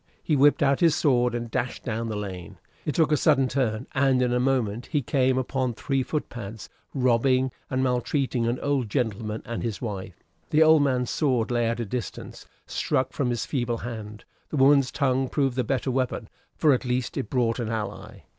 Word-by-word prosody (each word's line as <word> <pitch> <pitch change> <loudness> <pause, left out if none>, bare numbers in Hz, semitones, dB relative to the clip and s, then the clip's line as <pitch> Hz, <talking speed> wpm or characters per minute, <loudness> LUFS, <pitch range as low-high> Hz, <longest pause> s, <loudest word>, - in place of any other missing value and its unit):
He 155 - +1
whipped 145 +2 +4
out 140 -1 +3
his 165 -3 +4
sword 125 -4 +2
and 120 -1 -4
dashed 125 0 -2
down 115 -1 -3
the 110 - -3
lane. 95 -4 -6 0.3
It 150 - -1
took 160 -2 +3
a 150 - +4
sudden 135 0 +3
turn, 125 -3 -1
and 135 -1 +3
in 125 -1 +1
a 125 - +2
moment 125 -3 0
he 145 -4 -1
came 130 +1 +2
upon 130 -1 -1
three 135 +2 -1
foot 150 +4 -2
pads, 110 -2 -8 0.3
robbing 130 +1 +2 0.2
and 130 0 0
maltreating 125 -1 0
an 120 +2 -1
old 140 -5 0
gentleman 110 -2 -2
and 115 0 -4
his 110 -5 -3
wife. 100 -5 -6 0.3
The 155 +1 +5
old 160 -1 +6
man's 125 -3 +1
sword 125 -6 +1
lay 120 -1 +1
at 115 +1 -1
a 115 - -1
distance, 115 0 -6 0.2
struck 130 0 -1
from 135 -3 0
his 120 -2 -1
feeble 120 -4 -1
hand; 110 -3 -7 0.2
the 150 - -3
woman's 140 0 +5
tongue 130 -2 +1
proved 135 -4 0
the 130 - +1
better 130 +2 -1
weapon, 125 -3 -2 0.3
for, 150 -3 +4
at 130 - 0
least, 125 -1 -2
it - - -3
brought 120 -2 +1
an 115 -2 -2
ally. 110 -2 -5
125 Hz, 200 wpm, -26 LUFS, 115-135 Hz, 0.3 s, old